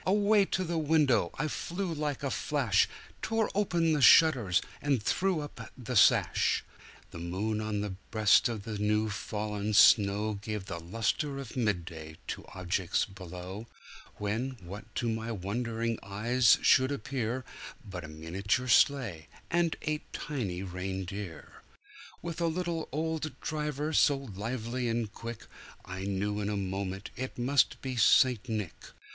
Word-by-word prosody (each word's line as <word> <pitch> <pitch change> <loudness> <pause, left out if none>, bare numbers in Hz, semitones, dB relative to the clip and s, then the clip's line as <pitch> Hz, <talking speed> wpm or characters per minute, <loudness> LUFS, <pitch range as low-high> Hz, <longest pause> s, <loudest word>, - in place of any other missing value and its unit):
Away 205 +1 +4
to 185 - -1
the 170 -2 -1
window 145 - +3
I 150 - 0
flew 175 +4 -3
like 150 -3 -3
a 140 - -1
flash, 130 -10 +2 0.3
Tore 225 -1 0
open 175 -5 +2
the 150 - +1
shutters 120 - +6 0.2
and 140 -7 +1
threw 185 - +1
up 135 -6 -8
the 125 0 -5
sash. 100 - +4 0.5
The 85 - -8
moon 100 +6 -2
on 105 -1 -2
the 105 -1 -3 0.2
breast 110 0 +4
of 110 -4 -4
the 110 -2 -5
new 105 +1 +1
fallen 105 0 -3
snow 105 0 +5
Gave 105 -2 -4
the 85 - -5
lustre 115 - -1
of 135 -4 -7
mid 105 -9 0
day 80 -2 -9
to - - -4
objects 90 -1 -1
below, 95 +2 -8 0.5
When, 115 +6 -2
what 100 +4 -8
to 120 - -1
my 115 0 -2
wondering 115 +3 -2
eyes 110 +5 +3
should 130 +1 +5
appear, 130 -3 -3 0.4
But 90 -3 -6
a - - -7
miniature 95 +10 -2
sleigh, 115 - +3 0.2
and 170 -1 +2
eight 155 0 -3
tiny 100 -11 -3
reindeer, 95 -1 -6 0.6
With 170 0 -4
a 170 - +2
little 170 -1 -2
old 155 +1 -3
driver, 150 0 -2
so 145 -2 +4
lively 120 +1 -4
and 115 -2 -2
quick, 115 -1 -7 0.4
I 95 +1 -5
knew 100 +1 -1
in 105 0 -2
a 105 - -1
moment 95 0 -4
it 130 +1 -5
must 130 +3 +2
be 130 -1 -3
St. 125 +1 +4
Nick. 105 -6 -2
115 Hz, 150 wpm, -30 LUFS, 100-140 Hz, 0.6 s, shutters